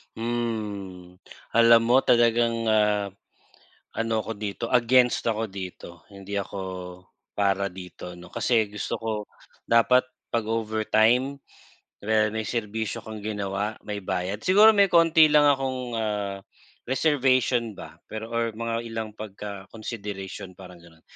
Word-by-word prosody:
Hmm, 105 -6 -4 0.4
alam 115 0 +7
mo 130 +2 +5
talagang, 115 -1 +3
ah, 105 -2 +2 0.9
ano 115 0 -1
ko 115 - -5
dito, 105 +2 -4
against 125 0 +3
ako 110 0 0
dito. 90 -3 -9
Hindi 100 0 -8
ako 100 0 -5 0.8
para 100 -1 +1
dito 90 -1 -9
'no, 90 0 -13
kasi 110 -4 +1
gusto 105 0 -4
ko 115 - -2 0.6
dapat 125 +2 +4 0.2
pag-overtime 115 +3 +1 0.6
kunwari 110 +1 +1
may 110 0 -4
serbisyo 110 0 -3
kang 110 -1 -9
ginawa 100 0 -2
may 105 -1 -5
bayad. 95 0 -3
Siguro 205 +4 +7
may 200 -2 +5
konti 165 -3 +5
lang 145 -1 +6
akong, 130 -3 -1
ah, 105 -3 -2 0.5
reservation 130 -4 +2
ba 80 -2 -11
pero 110 +1 -6
or 115 -1 -1
mga 115 0 -2
ilang 115 -1 -4
pagka-consideration 100 -1 -7
parang 90 -1 -13
ganon. 85 -1 -19
110 Hz, 120 wpm, -25 LUFS, 100-115 Hz, 0.9 s, alam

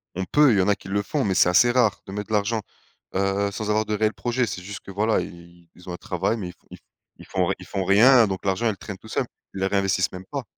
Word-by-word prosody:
on 95 +1 -2
peut, 145 +5 +4
il 105 - +3
y - - +5
en 90 - +1
a 105 - +3
qui 95 - -12
le 100 +1 0
font 145 +6 -1
mais 95 -3 0
c'est - - +5
assez 120 +7 +5
rare 120 -5 +2
de - - -9
mettre 105 +1 -5
de 110 - -5
l'argent, 105 +2 +1 0.6
heu, 100 +1 +1
sans 105 +1 -4
avoir 110 +1 +2
de 105 - -3
réels 110 +1 +1
projet 125 +1 -1
c'est 100 -4 -5
juste 100 +2 -8
que, - - -11
voilà, 110 +3 +1
i 85 0 -12
ils 90 +1 -13
ont - - -4
un - - -6
travail, 95 +6 -1
mais 95 -5 -5
ils - - -10
font - - -34
ils - - -9
f - - -30 0.4
ils - - -12
font 95 -2 0
r 95 - +1
ils 90 - -11
font 95 -1 -3
rien. 115 +5 +6
Donc 95 -1 -5
l'argent, 100 +4 +1
il 105 - -2
traîne 100 -1 -8
tout 110 - -15
seul, - - -1 0.3
il 95 - -6
le 95 - +2
réinvestissent 95 -2 +1
même 90 0 -9
pas. 140 -2 -3
100 Hz, 305 wpm, -24 LUFS, 95-110 Hz, 0.6 s, rien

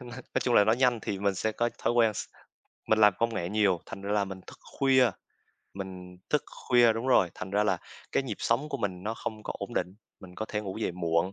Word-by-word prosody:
nói 125 0 -8 0.2
chung 120 - +1
là 105 - +7
nói 110 +2 +3
nhanh 125 -2 +3
thì 100 - -3
mình 100 -1 +1
sẽ 110 +4 -1
có 120 +2 0
thói - - +1
quen 115 -3 +3
s - - -3 0.6
mình 110 - +3
làm 105 -2 +7
công 115 -1 +1
nghệ 85 -4 -2
nhiều, 100 -4 +2
thành 100 - -8
ra 100 +1 -2
là 105 -1 +2
mình 95 -1 -8
thức - - -12 0.2
khuya 130 -3 +5 0.6
mình 90 -2 -8
thức 150 - +2 0.3
khuya 120 -2 +6
đúng 115 +3 -4
rồi. 95 -9 +4
Thành 95 - -7
ra 105 +1 +2
là - - +1 0.3
cái - - +2
nhịp 130 - -4
sống 135 +6 0
của - - -2
mình 95 -4 -3
nó 110 +3 -2
không 110 -2 -6
có - - -4
ổn - - -6
định. 90 - -1 0.3
Mình 90 -1 -12
có 110 - -4
thể 105 - -2
ngủ 95 -2 -6
dậy 110 - -1
muộn, 85 +1 0
105 Hz, 250 wpm, -29 LUFS, 95-120 Hz, 0.6 s, là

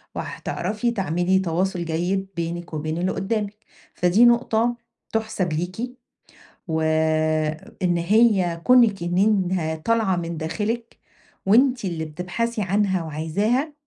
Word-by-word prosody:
وهتعرفي 210 +6 -3
تعملي 190 -2 +1
تواصل 180 0 -1
جيد 180 +4 -1
بينِك 170 0 -4
وبين 155 +1 -3
اللي 180 +2 0
قدامِك، 210 0 -2 0.4
فدي 180 +7 +4
نقطة 235 0 +3 0.4
تحسب 210 -7 -1
ليكِ، 190 +10 -4 0.7
وإن 155 +2 0
هي 185 -2 +3
كونِك 235 -7 +5
إن 175 +1 -1
إنها 185 -6 +1
طالعة 215 +2 +1
من 170 -1 -4
داخلكِ، 210 +9 -3 0.5
وأنتِ 250 +2 +4
اللي 165 -3 -3
بتبحثي 180 +9 -3
عنها 195 -2 +1
وعايزاها، 200 - -1
185 Hz, 110 wpm, -23 LUFS, 165-220 Hz, 0.7 s, كونِك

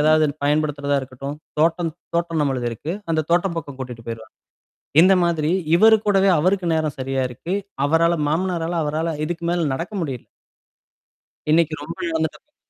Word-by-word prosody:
ஏதாவது 155 +1 +5 0.2
பயன்படுத்துறதா 145 -1 +1
இருக்கட்டும், 135 +2 -7 0.2
தோட்டம் 165 +1 +2 0.2
தோட்டம் 170 -2 0
நம்மளது 130 -4 0
இருக்கு. 145 +9 -5 0.2
அந்த 160 -1 +2
தோட்டம் 175 +1 +2
பக்கம் 145 -4 -5
கூட்டிட்டு 125 -3 -7
போயிருவாரு 110 -1 -7 0.7
இந்த 190 +2 +7
மாதிரி, 160 -3 +1 0.3
இவரு 220 +5 +7
கூடவே 195 -1 +4
அவருக்கு 185 +3 +1
நேரம் 155 -2 0
சரியா 135 0 -1
இருக்கு. 165 +9 -5 0.3
அவரால 165 +3 +3 0.2
மாமனரால 170 0 -1
அவரால 155 +2 -1
இதுக்கு 170 +1 -4
மேல 175 -2 +1
நடக்க 170 +9 -4
முடியல 135 -7 -4 1.3
இன்னைக்கு 160 -1 +3
ரொம்ப 165 +3 -7
இழந்துட்டோமே 160 - -3
160 Hz, 140 wpm, -22 LUFS, 145-170 Hz, 1.3 s, இந்த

